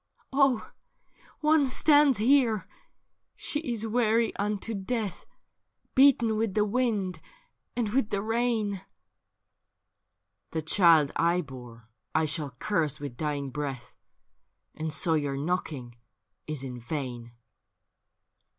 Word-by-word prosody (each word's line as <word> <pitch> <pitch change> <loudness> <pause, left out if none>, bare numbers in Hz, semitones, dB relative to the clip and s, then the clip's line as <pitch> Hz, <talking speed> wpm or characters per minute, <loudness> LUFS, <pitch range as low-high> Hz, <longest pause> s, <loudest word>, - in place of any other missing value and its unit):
Oh! 275 -4 +2 0.7
one 305 -2 +4
stands 290 0 +4
here— 230 -2 +3 0.7
she 295 - -3
is 235 -8 -3
weary 225 0 +2
unto 210 +2 -2
death, 210 0 -3 0.7
Beaten 250 -5 +5
with 220 -3 -1
the 210 -1 +3
wind 205 -7 -1 0.5
and 235 -4 0
with 225 -1 +1
the 200 0 -1
rain.' 225 -3 0 0.9
' - - -54
The 160 -1 -2
child 160 -3 +5
I 170 +2 +2
bore 125 -6 -11 0.3
I 160 - +3
shall 150 -3 -3
curse 160 -6 -1
with 140 -4 -6
dying 145 -1 -3
breath, 135 -3 -5 0.8
And 155 0 -4
so 165 +2 +2
your 145 -3 0
knocking 140 -6 -3 0.5
is 155 -3 -4
in 125 -2 -6
vain.'' 120 -2 -5
190 Hz, 115 wpm, -28 LUFS, 145-230 Hz, 0.9 s, Beaten